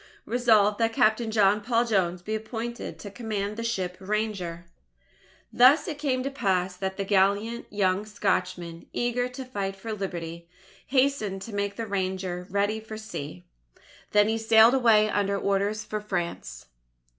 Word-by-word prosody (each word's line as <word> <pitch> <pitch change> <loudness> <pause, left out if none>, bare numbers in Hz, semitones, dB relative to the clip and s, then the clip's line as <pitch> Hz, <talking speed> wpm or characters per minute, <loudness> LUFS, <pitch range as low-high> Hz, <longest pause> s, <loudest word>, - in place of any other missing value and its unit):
Resolved: 220 -4 +3
that 225 0 +1
Captain 220 +1 +2
John 210 -1 +3
Paul 235 +2 +1
Jones 180 -5 0
be 215 - -4
appointed 225 +2 -5
to 205 - -9
command 210 -2 -3
the 230 - -4
ship 185 -6 -2
Ranger. 190 -4 -3 0.9
Thus 255 +8 +6
it 305 -4 -5
came 260 -4 0
to 275 - -3
pass 190 -7 0
that 190 +1 -4
the 195 - -2
gallant 200 +4 +1
young 200 0 0
Scotchman, 180 -5 -2
eager 245 +1 0
to 255 +1 -7
fight 200 -5 -3
for 220 +3 -6
Liberty, 170 -4 -6 0.4
hastened 255 -8 +1
to 225 - -9
make 200 0 -2
the 230 - -4
Ranger 185 -2 -3
ready 205 +2 0
for 220 0 -8
sea. 145 - -7 0.7
Then 210 0 +4
he 225 +1 0
sailed 225 +1 +6
away 225 -5 +5
under 200 -1 0
orders 200 +2 0
for 215 0 -4
France. 170 - -4
210 Hz, 155 wpm, -26 LUFS, 190-225 Hz, 0.9 s, Thus